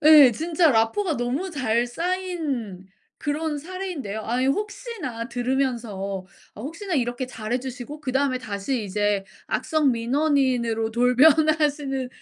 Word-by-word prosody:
네. 295 -5 +9
진짜 325 +4 +2
라포르 225 - +2
가 325 -6 0
너무 260 +10 -2
잘 240 -6 +1
쌓인 300 - -3 0.3
그런 300 +1 -2
사례인데요. 330 - -5
아 245 +3 0
혹시나 395 - -3
들으면서 245 -2 -1 0.6
어 210 - -9
'혹시나 335 - -4
이렇게 245 -1 -1
잘해주시고 250 +4 -5
그다음에 265 -1 0
다시 215 +2 -3
이제 205 0 0 0.2
악성 305 -5 +1
민원인으로 245 -3 +1
돌변하시는 280 +2 +3
265 Hz, 290 characters per minute, -24 LUFS, 235-310 Hz, 0.6 s, 네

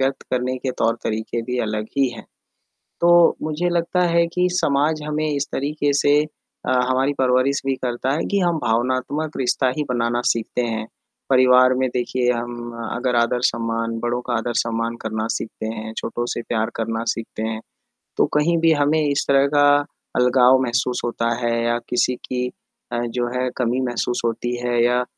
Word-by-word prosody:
व्यक्त 135 +1 0
करने 125 0 0
के 130 - -2
तौर-तरीके 115 0 -1
भी 125 +2 -3
अलग 105 0 -3
ही 135 -1 +3
हैं। - - -10 0.8
तो 175 0 +5
मुझे 155 +3 -1
लगता 175 +1 +1
है 170 0 +3
कि 180 0 +2
समाज 150 -2 +1
हमें 155 +1 -1
इस 145 -1 -1
तरीके 145 +1 0
से 145 0 +4 0.5
अ, - - 0 0.2
हमारी 130 +2 +2
परवरिश 130 +2 +2
भी 135 - +2
करता 125 +2 -1
है 155 - -1
कि 200 - +2
हम 175 -3 +1
भावनात्मक 130 +6 -1
रिश्ता 130 0 +1
ही 150 - 0
बनाना 120 -1 0
सीखते 115 +2 -3
हैं, 110 -1 -3 0.4
परिवार 130 0 +6
में 130 0 +1
देखिए 125 0 0
हम 120 0 -5 0.2
अगर 125 +1 -1
आदर-सम्मान 115 -1 0
बड़ों 120 +1 -1
का 125 - -1
आदर-सम्मान 115 0 -1
करना 110 0 -2
सीखते 110 0 -6
हैं, 110 0 -5
छोटों 120 - -3
से 120 - -4
प्यार 110 -1 -1
करना 115 0 -2
सीखते 115 -1 -3
हैं, 110 0 -3 0.6
तो - - +4
कहीं 160 +3 +3
भी 165 0 +4
हमें 145 +1 +2
इस 140 0 0
तरह 140 0 +4
का 145 0 +6 0.5
अलगाव 125 +1 +5
महसूस 125 0 0
होता 115 -1 -1 0.2
है 120 - +1
या 120 0 +1
किसी 125 +1 +1
की 125 0 -3 0.4
अ, 120 - -1
जो 120 +1 -2
है 125 0 0
कमी 125 0 0
महसूस 120 0 -1
होती 120 +1 -1
है 120 -1 +2
या 125 +1 +2
125 Hz, 170 wpm, -21 LUFS, 115-140 Hz, 0.8 s, परिवार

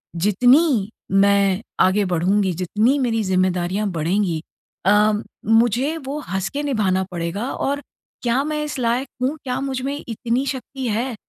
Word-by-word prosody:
जितनी 235 - +3 0.2
मैं 200 0 +3 0.2
आगे 190 +3 +4
बढूँगी, 185 +3 +1
जितनी 210 - +1
मेरी 225 -4 0
ज़िम्मेदारियाँ 185 +1 0
बढ़ेंगी 170 0 0 0.4
अ, 210 +2 +5 0.3
मुझे 240 +7 +3
वो 285 +3 -3
हँस 190 +1 -1
के 290 +1 -2
निभाना 205 -9 +1
पड़ेगा 175 +8 -3
और 285 +1 -2 0.4
क्या 245 +3 +2
मैं 300 0 -2
इस 300 - -4
लायक 240 +3 0 0.2
हूँ? 285 +4 0
क्या 255 -1 -2
मुझ 265 -2 -2
में 275 +2 -2
इतनी 240 +3 -1
शक्ति 260 -1 -4
है 235 +3 -1
220 Hz, 145 wpm, -21 LUFS, 190-260 Hz, 0.4 s, अ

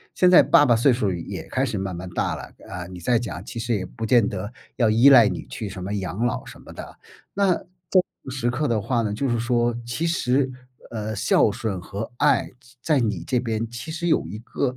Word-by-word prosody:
现 180 -1 +4
在 180 - +9
爸 145 - +5
爸 120 - +4
岁 120 +4 +4
数 105 -5 0
也 85 -2 -5
开 - - 0
始 - - -3
慢 95 -1 -3
慢 90 +1 -6
大 - - -1
了， - - -8 0.3
啊， 90 -1 -6
你 90 -1 -10
再 120 +6 +2
讲 100 -6 -6
其 115 - -7
实 115 +1 -1
也 95 -2 -3
不 115 +4 -6
见 115 0 +4
得 105 +4 -5 0.2
要 115 -3 +3
依 115 +6 +6
赖 120 -5 +8
你 - - -4
去 110 - -6
什 95 -1 -7
么 100 +2 -4
养 100 +3 -2
老 120 - -2
什 - - -12
么 - - -13
的， - - -9 0.4
那 200 -1 +2
这 - - -6
种 175 -1 -24 0.4
时 125 -2 -1
刻 145 +5 -1
的 110 -3 0
话 120 +2 0
呢， 105 -2 -1
就 135 +4 -1
是 120 -1 0
说， 120 0 +1
其 135 +8 -2
实， 135 -5 +1 0.4
呃， 110 -1 -4
“孝 105 0 +3
顺” 100 -2 -3
和 100 +6 -6
“爱” - - +2 0.3
在 150 -1 +2
你 105 -7 -1
这 125 - +1
边 115 -2 -2
其 120 +7 -7
实 175 +2 -2
有 160 - +2
一 95 +6 -7
个， 130 +2 -3
115 Hz, 250 characters per minute, -23 LUFS, 100-130 Hz, 0.4 s, 在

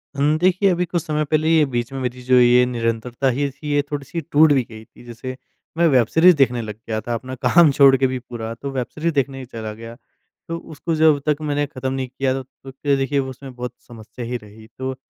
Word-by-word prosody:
हुँ। 145 +2 +2
देखिए 185 +3 +3
अभी 180 0 0
कुछ 175 0 -2
समय 155 0 -1
पहले 155 +2 +1
ये 160 -2 +5
बीच 120 +1 -2
में 135 - -4
मेरी 125 0 -4
जो 130 0 +3
ये 125 0 +5
निरंतरता 120 +2 -1
ही 140 +3 0
थी 145 +2 -7
ये 145 - +3
थोड़ी-सी 145 +3 -4
टूट 155 +1 +6
भी 135 - +3
गई 110 0 -11
थी। - - -18
जैसे 120 +2 -7 0.4
मैं 170 0 +4
वेब 125 -6 +4
सीरीज़ 175 +1 +5
देखने 125 -4 +2
लग 105 -2 -6
गया 110 -1 -1
था 120 +2 -4
अपना 130 +3 -5
काम 170 -4 +6
छोड़ 135 -1 +6
के 130 0 +2
भी 130 0 -3
पूरा। 115 -2 -7
तो 140 +4 -6
वेब 125 -3 -3
सीरीज़ 165 +2 -2
देखने 135 -1 -1
ही 130 - -7
चला 110 -3 -7
गया। 115 +1 -10 0.5
तो 165 0 -3 0.2
उसको 160 +3 -2
जब 155 -2 +4
तक 150 -1 +2
मैंने 145 -1 0
खत्म 130 -2 -4
नहीं 130 -1 -3
किया 130 +1 -1
तो, 135 0 -4
तो 135 +1 -14
क्या 140 +1 0
देखिए 135 +1 0
उसमें 130 0 -6
बहुत 125 0 -5
समस्या 115 +1 -9
ही 120 +1 -3
रही। 110 0 -15
तो 130 0 -4
130 Hz, 240 wpm, -21 LUFS, 120-145 Hz, 0.5 s, टूट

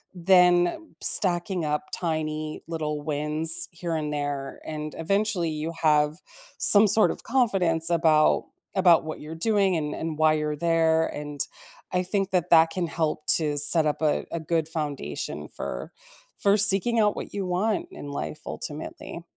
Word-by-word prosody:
then 180 - +3
stacking 175 -2 +2
up 150 0 -2
tiny 155 -2 -3
little 155 -2 -3
wins 155 +3 -1
here 170 -1 -4
and 150 -1 -3
there, 145 -2 -4
and, 155 -1 -6
eventually, 195 0 -1
you 155 +1 -4
have 150 -1 +2 0.4
some 205 +1 +7
sort 215 +2 +5
of - - -9
confidence 185 -10 +1
about 160 -3 +3 0.3
about 180 -3 +5
what 155 0 -6
you're 155 +2 -8
doing 195 +1 +1
and 150 -2 -3
and 160 -1 -5
why 155 0 +4
you're 150 -1 -2
there, 160 0 +2
and 145 -1 -7 0.5
I 180 0 0
think 195 +1 -1
that 180 -2 0
that 165 -1 +6
can 180 +1 -2
help 155 -2 -2
to 150 -3 -2
set 155 +2 +4
up 150 - -2
a 150 - +1
a 170 - -3
good 160 0 -1
foundation 145 - -5
for - - -6 0.5
for 200 +1 +3
seeking 215 +3 +3
out 210 -1 +2
what - - -7
you 200 -2 -3
want 215 - -1
in 145 - -9
life, 145 +2 -5
ultimately. 155 +3 -6
165 Hz, 160 wpm, -25 LUFS, 150-180 Hz, 0.5 s, some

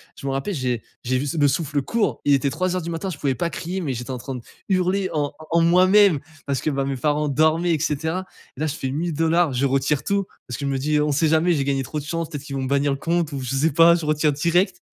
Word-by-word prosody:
je 140 - -7
me - - 0
rappelle, 135 +9 -2
j'ai 125 -6 -2 0.2
j'ai 130 +1 0
vu 140 +3 -2
le 145 - +5
souffle 145 0 0
court. 220 - -1
Il 145 - +4
était 135 +1 0
03:00 185 +2 -1
du 170 - -4
matin, 170 +4 -3
je 170 - -6
pouvais 140 -2 0
pas 170 +7 -1
crier, 175 +4 -4
mais 145 -6 -2
j'étais 125 +2 -5
en 130 - -4
train 135 +2 -6
de 125 - -6 0.3
hurler 185 0 +1
en 145 -2 -1 0.2
en 170 +1 +3
moi-même, 185 0 +5 0.3
parce 140 -2 -1
que - - 0
bah 135 -2 -1
mes 135 - -2
parents 150 +3 0
dormaient 160 +4 +2
et 155 - 0
cetera. 160 +5 -1 0.3
Et - - -14
là, 155 - +1
je 150 - -3
fais 130 -4 -3
1000$, 165 +1 +1
je 130 +2 0
retire 135 +1 +1
tout 200 -1 0 0.2
parce 125 - -5
que 140 - -3
je - - 0
me 135 - 0
dis, 150 +3 +1
on 150 0 +1
sait 150 +3 +2
jamais, 160 +3 +3
j'ai 140 -4 0
gagné. 135 -1 0
Trop 150 +4 -4
de 145 - -8
chance, 165 +1 -3
peut 150 - -5
être 140 - -9
qu'ils 140 -1 -6
vont 135 - -2
bannir 140 +2 +1
le 135 - -1
compte, 170 -2 0
ou 140 -2 -4
je 130 +1 -3
ne - - +1
sais 160 +1 +3
pas, 165 +3 +7
je 165 -2 -3
retire 150 0 +2
direct 175 +5 +1
150 Hz, 285 wpm, -22 LUFS, 135-170 Hz, 0.3 s, pas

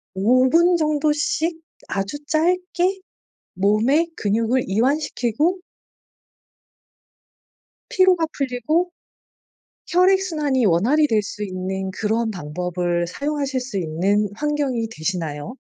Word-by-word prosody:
5 255 +7 +3
분 345 +3 +4
정도씩 315 +3 0 0.3
아주 195 +7 -3
짧게 360 +4 +1 0.5
몸에 220 - +2
근육을 230 +4 0
이완시키고 275 - 0 2.3
피로가 370 -3 +4
풀리고 280 +7 0 1.0
혈액 370 +2 +4
순환이 295 - 0
원활히 235 - +3
될 220 -5 +1
수 210 +1 -6
있는 190 0 -4
그런 220 +3 -1
방법을 175 +1 -2
사용하실 280 - -2
수 240 -6 -4
있는 190 +5 0
환경이 285 -5 -1
되시나요? 165 0 -4
250 Hz, 210 characters per minute, -21 LUFS, 195-310 Hz, 2.3 s, 분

